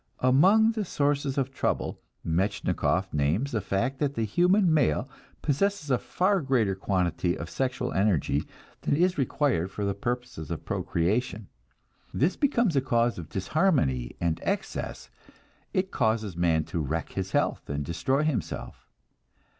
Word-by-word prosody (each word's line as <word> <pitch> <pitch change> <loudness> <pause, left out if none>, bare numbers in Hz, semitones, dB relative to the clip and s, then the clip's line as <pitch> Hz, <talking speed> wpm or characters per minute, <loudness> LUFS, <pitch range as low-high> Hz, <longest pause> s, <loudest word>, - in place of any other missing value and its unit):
Among 190 - +5
the 220 -2 -2
sources 145 -5 0
of 135 -1 0
trouble, - - -2 0.2
Metchnikoff 95 +1 0
names 80 - +1
the 110 - -1
fact 100 +8 -1
that 145 -2 0
the 115 - 0
human 180 - +3
male 135 - +2 0.4
possesses 155 +1 0
a 125 - +3
far 190 +1 +1
greater 125 -8 +1
quantity 90 -3 0
of 85 0 -7
sexual 130 +7 -2
energy 95 -8 +1 0.4
than - - +1
is 180 +1 +2
required 130 - +1
for 100 0 -2
purposes 120 - -4
of - - -5
procreation. 100 +4 -1 0.6
This 160 +8 +1
becomes 240 - +2
a 135 - +4
cause 120 -4 +1
of 80 -3 -8
disharmony 95 - +1
and 85 -2 0
excess, - - -3 0.6
it 190 +1 -1
causes 110 -4 0
man 85 -2 +2
to 85 - -4
wreck 80 +3 -2
his 95 0 -4
health - - 0
and 70 0 -2
destroy 130 - 0
himself. 155 -4 -3
120 Hz, 140 wpm, -27 LUFS, 90-145 Hz, 0.6 s, Among